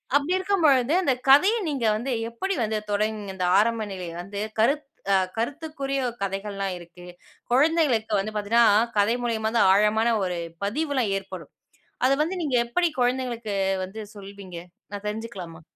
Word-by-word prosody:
அப்படி 290 +5 +2
இருக்கும் 375 -2 +1
பொழுது, 270 -1 +4
அந்த 275 - +3 0.2
கதையை 375 +12 +6
நீங்க 270 -6 -2
வந்து 250 +4 -3 0.2
எப்படி 385 +12 -2
வந்து 215 0 -1
தொடங் 215 +1 0
இந்த 185 -1 -2
ஆரம்ப 225 0 +1
நிலையில 175 -2 -6
வந்து 200 +2 -6 0.2
கருத்துக் 275 +4 +1 0.2
அ, - - +6 0.2
கருத்துக்குரிய 275 +2 -3 0.2
கதைகள் 195 +1 -4
எல்லாம் 195 -1 -2
இருக்கு. 175 0 -14 0.5
குழந்தைகளுக்கு 265 -5 +2
வந்து 205 +3 -3
பாத்தீங்கன்னா 215 +3 +3 0.3
கதை 205 +3 +3
மூலமா 220 -2 -1
தான் 190 - +5
ஆழமான 210 +3 +3
ஒரு 180 -1 -2 0.3
பதிவு 285 +8 -1
எல்லாம் 240 -6 +1
ஏற்படும். 185 -5 -9 0.5
அது 270 +1 +4
வந்து 345 +5 -3
நீங்க 280 -6 +1
எப்படி 345 +9 +1
குழந்தைகளுக்கு 245 -4 -1 0.3
வந்து 215 +4 -8
சொல்வீங்க? 195 -2 -10 0.4
நான் 205 0 -6
தெரிஞ்சுக்கலாமா? 205 -7 -6
225 Hz, 150 wpm, -25 LUFS, 200-275 Hz, 0.5 s, கதையை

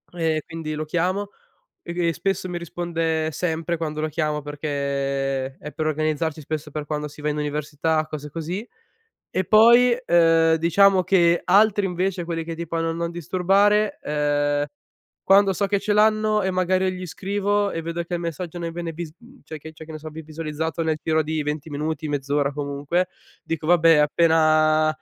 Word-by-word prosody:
e 160 -2 0
quindi 160 -2 -5
lo 155 +1 -3
chiamo, 185 +5 -1 0.5
e 170 - -6
di 175 -1 0
e - - +2
spesso 195 -1 -2
mi 175 - -4
risponde 165 -2 -2
sempre 165 +1 -2
quando 155 -2 -4
lo 155 - -1
chiamo, 150 -1 -1
perché 140 -2 -2
è 150 - -8
per 155 -2 -3
organizzarci, 155 +1 -1
spesso, 155 +1 -5
per 150 0 -5
quando 150 0 -3
si 150 +1 -14
va 150 - -2
in 150 - -1
università, 150 +1 -1
cose 150 -1 -7
così. 170 +8 -5 0.6
E 185 - -1
poi, 235 +4 +6
uhm, 165 -1 +4
diciamo 185 +4 +4
che 170 -2 +3
altri 205 +1 +4
invece, 180 0 -2
quelli 165 -1 -3
che 165 0 -5
tipo 165 0 -4
hanno 165 0 0
non 170 0 -3
disturbare, 195 +5 +2
uhm, 145 -1 0 0.6
quando 195 0 +5
so 200 - 0
che 200 0 0
ce 205 +1 0
l'hanno 215 0 +3
e 190 - 0
magari 185 0 +1
gli 185 0 -6
scrivo 205 +2 -1
e 165 - -3
vedo 170 +1 -3
che 175 - -5
il 170 - -2
messaggio 170 +1 -5
non 170 -1 -4
viene 170 0 -5
vis 160 -1 -7
mhmm, 250 +3 -18
cioè 155 - -8
che 160 +2 -10
c'è 160 0 -11
che 160 - -9
ne 155 - -6
so, 155 - -8
vi 160 +1 -8
visualizzato 160 +1 -4
nel 160 -1 0
giro 160 0 +2
di 155 0 -2
20 150 +1 -4
minuti, 155 +2 -3
mezz'ora 145 0 0
comunque, 145 +5 -1 0.3
dico: 160 -1 -4
"Vabbè 165 -1 +5
appena 155 0 +4
165 Hz, 185 wpm, -23 LUFS, 150-180 Hz, 0.6 s, poi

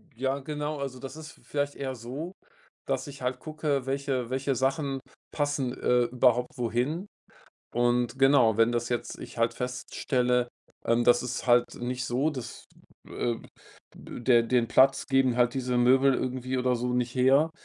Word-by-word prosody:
Ja, 135 +3 -1
genau. 150 +1 -4
Also 135 -2 -5
das 135 +1 -8
ist 160 0 -9
v - - -21
vielleicht 145 0 -2
eher 135 -1 -4
so, 135 +10 -6 0.5
dass - - -2
ich 140 -2 -10
halt 125 0 -2
gucke, 150 -3 -2
welche 135 -3 -2
welche 135 +1 -1
Sachen 135 +1 0 0.3
passen, 145 -4 -1
äh, 125 -1 +2
überhaupt 125 +1 +1
wohin. 125 - -1 0.7
Und 120 +1 +1
genau, 135 -5 +5
wenn 115 +1 +4
das 120 0 -1
jetzt 120 -1 -3
ich - - -10
halt 115 0 +1
feststelle, 125 0 -1 0.4
ähm, 115 +1 +2
das 120 0 +5
ist 125 0 -4
halt 120 0 +5
nicht 125 +1 -3
so, 130 +5 0
dass, 130 -5 -8 0.4
äh 120 -1 -2 0.6
der 120 -1 +1
den 120 0 +1
Platz 135 +3 +4
geben 135 -2 +2
halt 120 -1 +2
diese 125 -2 -1
Möbel 130 +2 +5
irgendwie 130 0 -2
oder 125 0 +1
so 125 +1 -2
nicht 125 0 -1
her. 135 +5 +4
125 Hz, 165 wpm, -28 LUFS, 120-135 Hz, 0.7 s, genau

